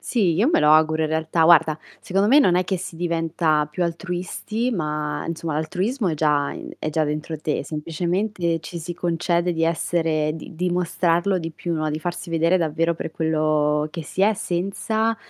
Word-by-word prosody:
Sì, 195 -9 +1
io 210 - +3
me - - +3
lo 150 0 +5
auguro, 155 0 +4
in 155 - 0
realtà 160 +1 0
guarda, 160 -2 +5 0.2
secondo 195 +3 +1
me 280 +4 +7
non 185 -11 +4
è 180 - +3
che 190 0 -1
si 175 -1 -7
diventa 165 -2 0
più 180 +4 -3
altruisti, 180 +7 -3
ma 150 -6 -2
insomma, 165 -1 -3
l'altruismo 190 - -1
è 160 - 0
già 150 -2 +1
in - - -8
è 155 - -3
già 160 +1 +1
dentro 155 +2 -3
te. 155 - -2
Semplicemente, 170 +2 -2
ci 170 +2 -7
si 170 +1 -6
concede 175 +1 0
di 165 -1 0
essere 160 -2 0
di 160 +1 -9
dimostrarlo 180 +1 +1
di 165 -1 -5
più, 170 +2 -5
no? 155 -1 -1
Di 155 - -2
farsi 175 +2 -5
vedere 165 +2 +3
davvero 165 0 0
per 160 - -5
quello 155 -2 +1
che 165 -1 -6
si 190 - -2
è, 215 +2 +4
senza, 210 +5 -1
165 Hz, 190 wpm, -23 LUFS, 155-180 Hz, 0.2 s, me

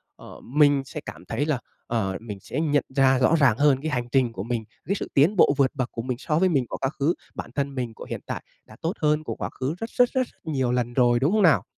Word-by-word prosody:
ờ, - - -12
mình 145 +1 +3
sẽ 150 - -6
cảm - - -9
thấy 125 +6 -1
là, 150 -5 0 0.3
ờ, 100 -5 -1
mình 105 -4 -7
sẽ 130 - -5
nhận 145 -3 +2
ra 135 -1 +4
rõ 130 +6 +4
ràng 130 -6 +4
hơn 140 -2 +3
cái 155 +1 -2
hành 125 -3 -1
trình 125 -3 +2
của 95 - -5
mình, 115 0 -2 0.2
cái 200 - 0
sự - - -4
tiến 155 +10 +4
bộ 145 - +5
vượt 135 -2 +3
bậc 130 -1 -2
của 115 - -4
mình 125 0 -3
so 155 +3 0
với 185 +1 +4
mình 135 -6 +1
của - - -4
quá 135 - -1
khứ, 150 +5 +2 0.2
bản - - -6
thân 140 -1 -2
mình 125 -3 -3
của - - -10
hiện - - -4
tại - - -5 0.2
đã 110 - -15
tốt 165 +3 -1
hơn 150 0 +2
của - - -4
quá - - -4
khứ 135 +5 -1
rất 225 +5 -5
rất 245 0 +3
rất 255 -1 0 0.2
nhiều 135 -6 0
lần 120 -1 -1
rồi, 120 -1 +4
đúng 140 +6 +2
không 215 +1 +3
nào? 165 -6 +5
135 Hz, 275 wpm, -25 LUFS, 120-155 Hz, 0.3 s, bộ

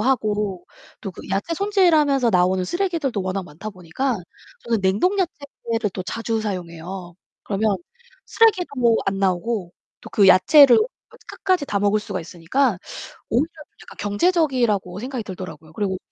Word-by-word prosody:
하고 210 -6 0 0.4
또 195 - -5
그 - - -11
야채 200 +13 -1
손질하면서 315 - +3
나오는 185 0 +2
쓰레기들도 325 - -1
워낙 185 0 -3
많다 180 +7 -8
보니까 195 +8 -2 0.5
저는 230 -3 0
냉동 205 - +1
야채를 275 - -3
또 185 - -4
자주 225 +3 -2
사용해요. 180 -2 -6 0.3
그러면 205 0 0 0.5
쓰레기도 425 -6 +3
뭐 235 -2 +4
안 195 0 0
나오고 190 0 -1 0.3
또 - - -12
그 200 -2 +4
야채를 245 +9 +7 0.3
그 - - -18
끝까지 370 -6 0
다 200 - 0
먹을 205 +1 +2
수가 200 -4 -5
있으니까 185 - 0 0.5
오히려 250 +7 +2 0.4
약간 - - -14
경제적이라고 215 - +1
생각이 255 -1 -4
들더라고요. 165 -5 -9
그리고 190 -3 -2
210 Hz, 340 characters per minute, -22 LUFS, 185-270 Hz, 0.5 s, 야채를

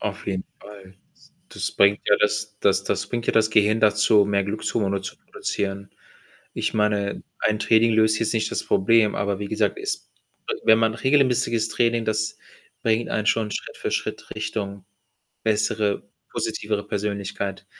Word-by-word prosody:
Auf 105 -1 -5
jeden 95 -1 -2 0.2
Fall. 95 -2 -13 0.2
S - - -24 0.2
das - - -3
bringt 100 +1 +4
ja, 105 - +7
das 105 0 0
das 100 -1 +3
das - - -2
bringt 120 -1 -4
ja - - +2
das 110 -1 +3
Gehirn 110 +1 +3
dazu, 105 -1 +4
mehr 100 -1 +1
Glückshermone 100 -1 -1
zu 95 - -7
produzieren. 100 -1 -4 0.6
Ich - - -2
meine, 105 -2 0 0.2
ein 105 -1 +1
Training 110 +1 +4
löst 110 0 +3
jetzt 115 0 0
nicht 110 -1 0
das - - -2
Problem, 110 +1 +3
aber 100 -1 -1
wie 105 - -4
gesagt, 110 - 0
es 400 -1 -4 0.4
w 445 - -1
wenn 110 - +6
man 115 -1 +2
regelmäßiges 125 -3 +2
Training, 115 0 +1
das 110 0 -1 0.5
bringt 115 +1 +1
einen 105 - -1
schon 110 -2 +1
Schritt - - -5
für - - -3
Schritt - - -3
Richtung 105 -3 -4 0.6
bessere, 105 -1 0 0.2
positivere 105 -1 -2
Persönlichkeit. 100 -2 -3
105 Hz, 160 wpm, -23 LUFS, 100-110 Hz, 0.6 s, ja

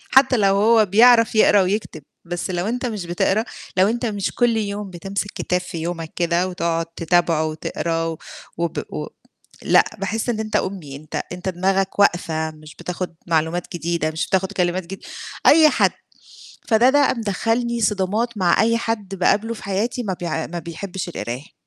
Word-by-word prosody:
حتى 265 -2 +6
لو 195 -2 +3
هو 220 +1 +5
بيعرف 230 +3 +5
يقرا 205 -2 +6
ويكتب 185 -5 -2 0.2
بس 175 +2 -4
لو 175 +1 -1
أنت 245 +2 -2
مش 210 -7 -3
بتقرا، 190 +5 +1 0.3
لو 190 +2 +5
أنت 240 +2 -1
مش 205 -3 -2
كل 240 -2 +2
يوم 205 -1 -3
بتمسك 195 +3 -4
كتاب 180 0 -1
في 180 -2 -7
يومك 165 -1 -4
كده 175 +1 +1
وتقعُد 170 -2 -1
تتابعه 165 -1 +1
وتقراه 165 +1 -2
و 160 - -5 0.4
وب 170 0 -2 0.2
و - - -4 0.5
لأ، - - +5
باحِس 220 +4 -2
إن 220 -2 -1
أنت 215 -1 -3
أُمي، 180 -10 -2
أنت 155 +2 -5
أنت 180 +1 -4
دماغك 190 +2 0
واقفة 160 -5 +2
مش 155 0 -14
بتاخُد 175 0 -5
معلومات 165 +2 0
جديدة 170 -2 -1
مش 160 - -2
بتاخُد 190 +1 0
كلمات 180 -1 0
جد 195 +1 -7 0.5
أي 310 0 +8
حد. - - +3 0.8
فده 235 +3 +5
ده 285 0 +4
مدخّلني 230 +2 -1
صدامات 210 +3 0
مع 180 0 +3
أي 230 +1 +3
حد 210 -4 -3
باقابله 210 +5 +1
في - - -11
حياتي 215 +6 -1
ما 190 -3 -2
بيع 165 -2 -2
ما 175 0 -5
بيحبش 175 +2 -6
القراية. 125 0 -6
190 Hz, 170 wpm, -21 LUFS, 170-220 Hz, 0.8 s, أي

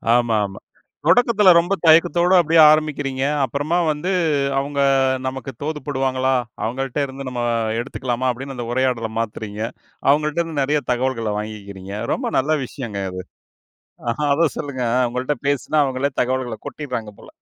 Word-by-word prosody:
ஆமா, 120 -2 +2
ஆமா. 95 -1 -8 0.5
தொடக்கத்துல 230 -6 +5
ரொம்ப 175 +3 +2
தயக்கத்தோட 170 +2 +5
அப்படியே 165 0 +4
ஆரம்பிக்கிறீங்க. 145 -3 0 0.2
அப்புறமா 145 +6 -1
வந்து 150 +5 -3 0.5
அவங்க 140 +1 -3 0.5
நமக்கு 135 0 -5
தோதுப்படுவாங்களா? 135 -3 -1 0.3
அவங்கள்ட்ட 130 +4 -3
இருந்து 135 0 -8
நம்ம 125 -1 -4 0.4
எடுத்துக்கலாமா? 125 0 -3
அப்படின்னு 135 +2 -7
அந்த 120 -1 -5
உரையாடலை 125 -3 0
மாத்துறீங்க. 110 -2 -4 0.5
அவங்கள்ட்ட 150 +3 +2
இருந்து 160 -4 -2
நிறைய 150 +2 +1
தகவல்களை 120 -3 -1
வாங்கிக்கிறீங்க. 100 -2 -7 0.2
ரொம்ப - - -2
நல்ல 140 +4 +1
விஷயங்க 115 -6 -6
இது. 95 - -5 1.1
அத 160 +4 +3
சொல்லுங்க. 140 -4 -4
அ - - +3
உங்கள்ட்ட 125 +4 -2
பேசினா 145 +2 0
அவங்களே 135 0 0
தகவல்களை 125 -2 -1
கொட்டிடுறாங்க 125 -8 -5
போல. - - -14
130 Hz, 130 wpm, -21 LUFS, 120-150 Hz, 1.1 s, தொடக்கத்துல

